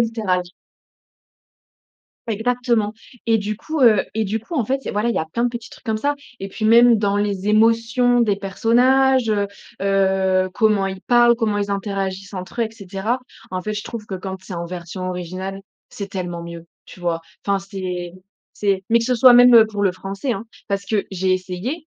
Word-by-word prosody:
littéral. 220 -6 0 1.8
Exactement! 230 -1 0 0.3
Et 225 -1 +3
du 210 0 -3
coup, 315 +5 -4
heu 220 -5 +5
et 220 0 -1
du 210 +3 -1
coup 225 +10 -9
en 265 -7 +1
fait 270 +5 -1
il - - -22
y - - -2
a - - -8
voilà 210 +3 0
il 235 - 0
y - - +1
a 160 - -1
plein 230 +9 -2
de - - +3
petits 235 -1 -8
trucs - - -15
comme 220 -2 -1
ça. 285 +6 0 0.3
Et 195 - -4
puis 215 +2 -3
même 235 +1 +6
dans 205 -1 +1
les 205 -1 -1
émotions 230 +3 +3
des 210 -4 +2
personnages, 245 +5 +3
heu, 205 -1 +1 0.3
heu, 190 -1 +2
comment 215 -4 +2
ils 190 -1 -5
parlent, 240 +1 +5
comment 220 -3 0
ils 205 0 -1
interagissent 195 -1 -3
entre 185 +6 -6
eux, - - +2
et - - -11
cetera. 210 +3 -3 0.3
En 185 0 -3
fait, 215 - -3
je 210 0 -4
trouve 230 -2 -7
que 200 - -6
quand 190 +1 -5
c'est 190 - -10
en 170 0 -4
version 180 +1 -6
originale, 185 +2 -5 0.3
c'est 200 -1 -7
tellement 175 -3 -4
mieux. 170 0 -9 0.2
Tu - - -14
vois? 170 -1 -1 0.3
Enfin, 200 -1 +2
c'est 185 -3 -5 0.4
c'est 195 -2 -1
mais 235 - +6
que 230 - -2
ce 255 - +2
soit 250 +1 +7
même 245 -2 +8
pour 205 -1 -4
le 195 -2 +3
français, 195 +7 -4
hein! 205 0 -5 0.2
Parce 200 0 -1
que 205 0 -1
j'ai 190 0 0
essayé 185 - -3
205 Hz, 205 wpm, -21 LUFS, 190-230 Hz, 1.8 s, même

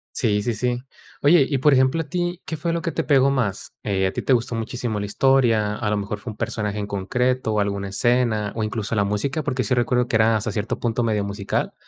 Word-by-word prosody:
Sí, 105 -4 +1
sí, 115 +2 -1
sí. 125 +3 -1 0.4
Oye, 145 -1 +6
y 140 - 0
por 145 +3 +4
ejemplo, 130 +4 +3
a - - -2
ti, 175 +2 -2
¿qué 160 - -4
fue 165 +2 -2
lo 165 0 -2
que 165 - -1
te 165 - -2
pegó 140 -2 +4
más? 115 -8 -2
Eh, 95 -2 +1
¿a - - -1
ti - - -4
te - - +1
gustó 120 -1 +1
muchísimo 115 -1 -3
la 100 - -3
historia? 115 -3 +2
¿A 110 - -2
lo 105 - +1
mejor 105 +1 -3
fue 110 +2 -7
un - - -15
personaje 105 -1 -3
en 105 - -3
concreto 125 +5 0
o 105 - +2
alguna 100 -1 -2
escena? 115 -1 +1
¿O, 110 - 0
incluso 110 +1 -3
la 100 - +3
música? 120 +10 -1
Porque 130 -3 -1
sí 110 - -2
recuerdo 125 0 +1
que 115 - +1
era 110 0 +4
hasta 110 +1 -2
cierto 105 +1 -3
punto 120 0 0
medio 105 -3 0
musical. 100 0 -2
115 Hz, 245 wpm, -22 LUFS, 105-130 Hz, 0.4 s, Oye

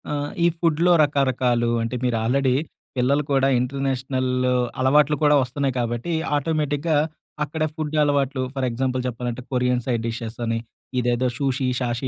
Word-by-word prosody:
ఆ! - - -2 0.3
ఈ - - +5
ఫుడ్‌లో 170 +1 +3
రకరకాలు 130 -4 +1
అంటే 115 +2 -2
మీరు 125 -2 +1
ఆల్రెడీ 130 +2 +2 0.4
పిల్లలు 140 +4 +2
కూడా 135 -1 +3
ఇంటర్నేషనల్ 130 0 -1 0.5
అలవాట్లు 145 +3 +4
కూడా 150 0 +5
వస్తున్నాయి 135 +1 -1
కాబట్టి 120 +7 -2 0.2
ఆటోమేటిక్‌గా 150 +1 0 0.5
అక్కడ 155 +2 -3
ఫుడ్ 155 -1 -3
అలవాట్లు 140 -2 +1
ఫర్ 135 -1 0
ఎగ్జాంపుల్ 130 +2 -1
చెప్పాలంటే 120 0 -4
కొరియన్ 125 -1 +1
సైడ్ 120 -3 -1
డిషెస్ 115 0 -5
అని 115 0 0 0.4
ఇదేదో 120 +1 +1
సూషి 135 -1 0
షాషి 120 +1 -2
130 Hz, 140 wpm, -23 LUFS, 125-145 Hz, 0.5 s, ఈ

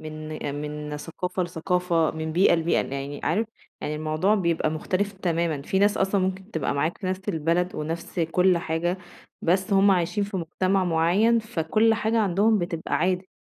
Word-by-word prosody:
من 155 0 -7 0.3
من 150 0 -5
ثقافة 180 +5 -3
لثقافة، 175 -1 0
من 160 0 -4
بيئة 180 +1 +5
لبيئة، 165 0 +1
يعني 140 +1 -5
عارف 210 +7 +1 0.3
يعني 150 - -3
الموضوع 155 +7 +1
بيبقى 170 -5 +1
مختلف 185 +6 -1
تمامًا، 170 -6 -1
فيه 190 +5 0
ناس 205 +1 +3
أصلًا 195 0 +1
ممكن 190 +2 -2
تبقى 160 -5 -1
معاك 155 +4 -1
في 190 - -5
نَفْس 190 +2 -3
البلد 170 +1 0
ونَفْس 165 +3 -4
كُلّ 180 +2 +3
حاجة 170 +2 -1 0.4
بس 190 +4 +1
هُم 195 +1 +5
عايشين 185 +2 +1
في 200 -1 -5
مجتمع 185 +2 0
معيّن، 180 +8 +3
فكُلّ 215 +2 +1
حاجة 225 +1 0
عندهم 210 +2 +3
بتبقى 175 -2 -3
عادي، 185 +2 0
175 Hz, 165 wpm, -25 LUFS, 160-195 Hz, 0.4 s, بيئة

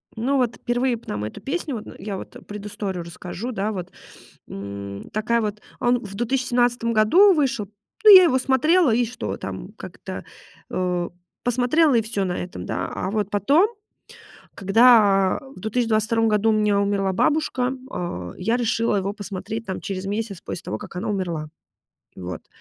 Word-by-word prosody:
Ну, 255 +5 0
вот 245 -3 +1
впервые 245 +1 0
б 230 - -12
нам 105 0 -3
эту 110 - -6
песню, 285 - -3
вот 215 - -7
н - - -10
я 200 -2 -4
вот - - -10
предысторию 200 -3 -5
расскажу, 180 +7 -6
да 210 -1 -2
вот. 180 -4 -6 0.6
М, 100 0 -7
такая 230 +2 +1
вот 210 -1 -3 0.2
А - - -1
он 245 0 +4
в 200 -1 -8
2017 240 0 +1
году 340 - +6
вышел, 270 - 0 0.4
ну, 420 -2 +11
я 370 - +10
его 260 -7 +3
смотрела 280 +4 +3
и 240 +2 +2
что 245 +2 -5
там - - -7
как-то, - - -8 0.5
э, 180 -1 -1 0.3
посмотрела 250 +5 +3
и 230 - +4
всё 215 -3 -2
на 180 -1 -2
этом, 175 - -6
да. 90 +1 -2
А 185 - -3
вот 210 -2 -1
потом, 280 - +3 0.9
когда 200 -2 +5 0.2
в - - -11
2022 225 +1 +1
году 215 0 +2
у - - +4
меня 210 -1 +2
умерла 200 -1 +1
бабушка, 260 +2 +1 0.2
а, 90 - -4
я 225 +6 0
решила 230 -2 +1
его 195 +1 -1
посмотреть 205 +2 -6
там 190 - -4
через 190 -1 -4
месяц 205 -2 -3
после - - -6
того, 105 - -4
как - - -10
она 205 +5 -3
умерла. 175 -6 -2 0.7
Вот. 90 -2 -7
215 Hz, 170 wpm, -23 LUFS, 190-245 Hz, 0.9 s, ну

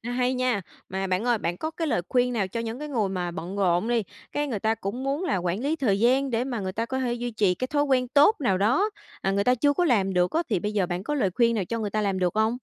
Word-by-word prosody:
hay 250 +1 0
nha. 250 -4 +1 0.3
Mà 190 +1 -2
bạn 185 +3 0
ơi, 240 -2 +2
bạn 175 -3 -2
có 315 - -3
cái 325 0 -3
lời 230 - +1
khuyên 250 0 +2
nào 205 -5 0
cho 230 - -3
những 230 +2 -4
cái 300 - -6
người 225 -8 0
mà 180 -2 -2
bận 185 +2 -6
rộn 185 +2 +2
đi, 240 -2 +2 0.3
cái 295 0 -1
người 240 -7 -2
ta 220 +3 +1
cũng 225 +3 -5
muốn 280 +6 -1
là 200 - +1
quản 180 +2 -1
lý 290 +5 0
thời 215 -10 +1
gian 260 +4 +3
để 235 +1 0
mà 250 -4 -3
người 190 -1 -3
ta 225 +4 -2
có 260 +2 -3
thể 250 -2 0
duy 240 0 -3
trì 205 -5 +2
cái 255 - -3
thói 290 +1 +1
quen 255 -3 +1
tốt 295 - +5
nào 195 -9 +2
đó, 255 - +2 0.3
à, 195 - 0
người 200 +1 +1
ta 250 - +4
chưa 285 +4 +2
có 350 +5 +1
làm 195 - +2
được 180 0 +2
á, 330 +2 +1
thì 200 -6 0
bây 210 +3 -2
giờ 200 -4 +1
bạn 175 +1 -3
có 295 +8 -2
lời 210 -10 +1
khuyên 235 -1 +3
nào 205 -4 0
cho 230 +6 -3
người 210 -2 -2
ta 215 - 0
làm 195 -2 0
được 180 0 0
hông? 220 +1 +3
230 Hz, 310 wpm, -26 LUFS, 195-255 Hz, 0.3 s, tốt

